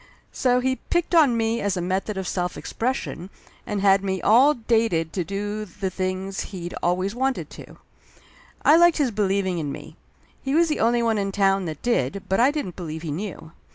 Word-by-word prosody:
So 250 -1 +2
he 260 +1 0
picked 345 0 -2
on 290 -8 +5
me 225 +1 0
as 200 -2 -1
a - - -1
method 190 +3 -2
of 190 -1 -3
self 180 -1 -2
expression, 230 -7 -3 0.4
and 205 -2 -2
had 195 0 +4
me 190 -1 -1
all 260 +10 +5
dated 220 -9 0
to 180 - -1
do 205 +4 -4
the 190 -1 -5
things 185 +1 -3
he'd 175 -3 -6
always 185 +3 0
wanted 265 +2 -2
to. - - -12 0.9
I 305 - +7
liked 345 0 +5
his 280 -5 +1
believing 195 -3 0
in 145 -3 -3
me. - - -9 0.5
He 270 +2 -1
was 335 0 +4
the 305 - -1
only 235 +1 +2
one 225 -2 +1
in 195 0 -1
town 195 -1 +2
that 155 -3 -6
did, 200 - 0
but 190 - +1
I 250 +3 +5
didn't 290 - -4
believe 160 -3 -6
he 160 - -4
knew. 165 -1 -6
200 Hz, 195 wpm, -24 LUFS, 185-240 Hz, 0.9 s, I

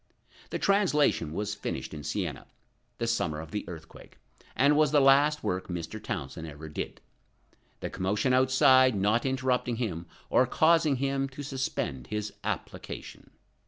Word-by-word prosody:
The - - -2
translation 150 - +2
was 105 +5 -2
finished 105 - -5
at 75 -3 -7
Siena, - - -3 0.5
the 115 - -2
summer 85 -10 -1
of 80 0 -9
the 105 - -3
earthquake, 80 -2 -11 0.4
and 140 +4 +4
was 150 0 +4
the 150 - +5
last 140 +2 +4
work 95 0 -2
Mr. 90 +5 -5
Townsend 80 -5 -5
ever 75 0 -9
did, 75 - -6 0.8
the - - -4
commotion 105 +7 0
outside 130 -1 +5
not 105 +6 +2
interrupting 130 -2 0
him, 90 -8 -3 0.2
or 125 - +4
causing 160 +1 +3
him 135 +1 -1
to 135 +2 -8
suspend 130 - -3
his 105 0 -4
application. - - -6
125 Hz, 145 wpm, -28 LUFS, 90-135 Hz, 0.8 s, the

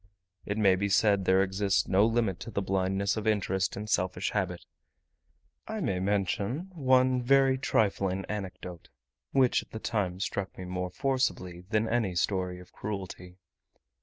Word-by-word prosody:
It 100 - -2
may 100 -3 +5
be 100 +2 -1
said 100 -1 +3
there 95 +1 +4
exists 95 +1 0
no 100 +3 +4
limit 115 -5 0
to - - -7
the 100 -3 -2
blindness 95 +2 0
of 110 0 -3
interest 95 -3 0
and 105 +1 -5
selfish 90 -2 0
habit. 90 -4 -2 1.0
I 220 0 -4
may 100 - -1
mention 105 - -1
one 130 -4 +3
very 135 +1 +4
trifling 95 -6 0
anecdote, 95 -4 -7 0.4
which 130 -2 +3
at - - -17
the 110 - -7
time 95 -6 -2
struck 100 0 -3
me 95 - -6
more 90 0 -3
forcibly 90 -7 -1
than 110 0 +1
any 110 -6 0
story 90 0 -1
of 90 - -14
cruelty. 95 -3 -6
100 Hz, 155 wpm, -29 LUFS, 95-110 Hz, 1.0 s, may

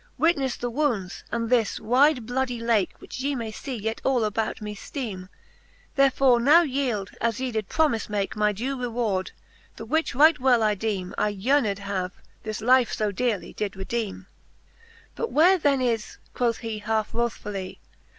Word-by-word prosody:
WitnefTe 280 -6 +2
the 245 - -3
wounds, 235 -10 -1
and 230 0 -1
this 230 -4 +2
wyde 255 +2 +3
bloudie 245 0 -2
lake, 230 -5 +1
Which - - -9
ye 280 +2 -1
may 230 -3 -4
fee 260 +4 -6
yet 220 0 -3
all 260 -4 +2
about 215 +1 -1
me 210 -1 -5
fteeme. 200 -6 -6 0.7
Therefore 270 -3 +4
now 300 +8 +6
yeeld, 255 - -2
as 230 0 0
ye 260 -1 -2
did 220 -3 -3
promife 295 -10 +1
make, 205 -2 -2
My 210 0 +2
due 250 +6 -3
reward, 225 -6 -1 0.5
the 225 - -8
which 315 +3 0
right 305 +3 +6
well 250 -3 +4
I 215 -1 +3
deeme 195 -3 -3
' - - -28
I - - +2
yearned 210 +1 +1
have, 195 -2 -3 0.3
that 215 0 -5
life 250 +1 +4
fo 210 -1 0
dearely 225 -1 -2
did 205 -2 -2
redeeme. 195 0 -3
XVI. 460 - -29
But 465 - -3
where 360 +5 +5
then 280 -4 +2
is, 230 -4 -1 0.2
quoth 235 -2 0
he 225 -2 -5
half 220 0 -1
wrothfully. 210 -5 -3
230 Hz, 175 wpm, -25 LUFS, 210-265 Hz, 0.7 s, now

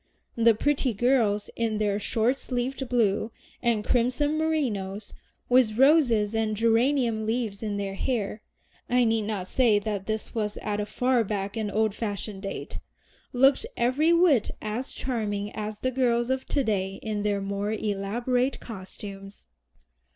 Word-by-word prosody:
The 230 -1 +5
pretty 275 -2 +1
girls 220 -3 +2
in 225 -2 -1
their 205 -1 0
short 230 +5 +1
sleeved 255 +1 -3
blue 220 -2 +1 0.3
and 230 -3 +1
crimson 255 +6 +1
merinos, 220 -11 -2 0.3
with 245 -4 +3
roses 250 -7 +4
and 220 -1 0
geranium 230 0 +2
leaves 220 -3 -2
in 210 -2 -2
their 200 -1 -3
hair 210 -1 -2 0.5
(I 250 +1 +4
need 225 -2 +1
not 205 -4 -2
say 235 -3 +3
that 205 -2 -3
this 220 0 -3
was 210 -2 -2
at 210 -1 -3
a 205 - -2
far 250 +1 +1
back 200 -1 -3
and 215 -2 -2
old 215 0 +1
fashioned 205 -2 -4
date), 195 -1 -6 0.5
looked 270 +5 +4
every 275 +7 +2
whit 335 - +4
as 220 +5 -3
charming 210 -5 -3
as 215 0 -5
the 255 +4 -1
girls 240 -1 +1
of 260 0 -2
to 280 - +1
day 195 -4 -1
in 215 -2 -2
their 205 -1 0
more 200 +1 -2
elaborate 225 +5 -1
costumes. 195 -1 -9
220 Hz, 150 wpm, -26 LUFS, 205-250 Hz, 0.5 s, The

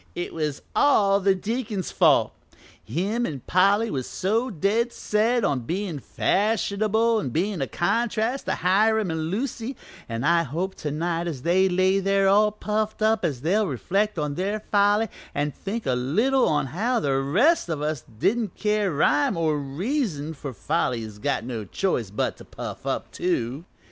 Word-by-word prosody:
"It 175 - -4
was 150 -3 -3
all 200 -9 +4
the 195 0 +3
deacon's 210 -1 -3
fault. - - +4 0.5
Him 195 - -1
an' 140 -4 -6
Polly 200 +5 +3
was 130 -3 -3
so 225 +7 0
dead 220 +5 0
set 225 +2 +1
on 140 -3 +1
bein' 170 - -3
fashionable 215 - +1
an' 195 - -3
bein' 180 - -1
a 135 - -1
contrast 225 - 0
to - - +1
Hiram 210 +2 +2
an' 160 -1 -2
Lucy, 235 +4 -3 0.3
an' 115 +1 -3
I 170 +3 +4
hope 170 +6 -3
to 150 - -4
night 165 +3 -2
as 140 -7 -5
they 185 +3 +3
lay 185 +2 +3
there 195 0 +2
all 210 +2 +4
puffed 215 +1 -2
up 220 -2 +2
as 145 -8 -1
they'll 200 +7 +2
reflect 195 - -1
on 150 -2 -1
their 200 +6 -2
folly 205 +2 +3 0.3
an' 145 +1 0
think 215 +9 -5
a 130 - +1
little 220 - +2
on 150 -2 +1
how 235 +7 +1
the 135 -2 +1
rest 180 - +2
of 150 -3 -2
us 155 -3 -2
as - - -30
didn't 215 - 0
care 210 -2 0
rhyme 145 +4 +2
or 160 -2 +1
reason 160 - -2
for 140 -2 -7
folly 125 -2 -1
is 105 -1 -9
got 105 - -1
no 115 -3 -4
choice 120 - -1
but 105 - -2
to - - -12
puff - - -8
up, - - -2
too. 145 -3 -2
190 Hz, 175 wpm, -25 LUFS, 150-215 Hz, 0.5 s, all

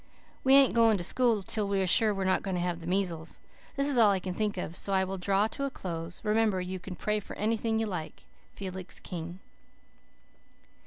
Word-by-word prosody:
We 265 +1 +6
ain't 275 -1 +6
going 230 -2 +4
to 175 - -4
school 230 0 +2
till 210 +1 0
we're 195 -1 0
sure 215 +4 +5
we 195 -1 -2
are - - -2
not 185 - +2
going 190 -2 -3
to - - -1
have 175 -1 -2
the 165 - -9
measles. 175 -4 -2 0.4
This 275 0 +1
is 275 -4 +3
all 220 -3 +7
I 195 -1 +2
can 185 0 -5
think 210 +1 -2
of, 175 -2 -4
so 195 - 0
I 190 0 +3
will 190 0 -4
draw 195 +2 +2
to 275 - -4
a - - -1
close. 170 -7 -6
Remember, 215 -2 +2
you 185 +1 -4
can 180 +1 -8
pray 210 +2 -1
for 205 - -10
anything 220 +1 0
you 225 - 0
like. 180 -7 -6 0.3
FELIX 185 -1 -6
KING." 175 0 -6
195 Hz, 220 wpm, -29 LUFS, 180-220 Hz, 0.4 s, all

